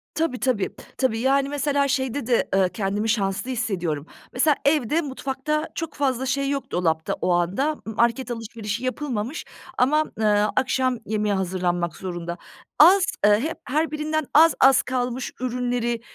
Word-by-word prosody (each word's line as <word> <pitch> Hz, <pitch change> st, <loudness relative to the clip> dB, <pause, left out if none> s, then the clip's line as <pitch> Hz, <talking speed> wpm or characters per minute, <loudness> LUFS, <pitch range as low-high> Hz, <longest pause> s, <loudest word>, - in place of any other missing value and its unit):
Tabii, 320 Hz, -6 st, -1 dB
tabii. 240 Hz, -7 st, 0 dB, 0.3 s
Tabii, 240 Hz, -4 st, +1 dB
yani, 275 Hz, +2 st, +2 dB
mesela 285 Hz, -1 st, +1 dB
şeyde 265 Hz, -1 st, -1 dB
de, 240 Hz, -2 st, +1 dB
ııı, 190 Hz, -1 st, +3 dB
kendimi 205 Hz, +2 st, -2 dB
şanslı 200 Hz, +2 st, 0 dB
hissediyorum. 180 Hz, -, -2 dB, 0.3 s
Mesela 285 Hz, +3 st, +3 dB
evde, 295 Hz, +1 st, +2 dB
mutfakta 285 Hz, +2 st, -3 dB
çok 325 Hz, -3 st, -4 dB
fazla 265 Hz, -2 st, -1 dB
şey 275 Hz, +2 st, 0 dB
yok 280 Hz, -1 st, -3 dB
dolapta 160 Hz, -2 st, 0 dB
o 180 Hz, -, +1 dB
anda. 195 Hz, -, 0 dB
M 220 Hz, -, -5 dB
market 235 Hz, +3 st, +1 dB
alışverişi 225 Hz, -1 st, -5 dB
yapılmamış 255 Hz, 0 st, -3 dB, 0.3 s
ama, 300 Hz, +5 st, +3 dB, 0.2 s
ııı, 210 Hz, -1 st, +3 dB
akşam 255 Hz, -1 st, +1 dB
yemeği 210 Hz, -1 st, 0 dB
hazırlanmak 175 Hz, -2 st, -1 dB
zorunda. 175 Hz, -2 st, -5 dB, 0.4 s
Az, 370 Hz, +5 st, +8 dB, 0.2 s
eee, 210 Hz, 0 st, +5 dB
hep 315 Hz, +7 st, -3 dB
her 310 Hz, +4 st, -1 dB
birinden 310 Hz, 0 st, -1 dB
az 320 Hz, +1 st, +7 dB
az 265 Hz, -1 st, +6 dB
kalmış 250 Hz, 0 st, -3 dB
ürünleri 245 Hz, -1 st, -1 dB
250 Hz, 150 wpm, -23 LUFS, 210-280 Hz, 0.4 s, Az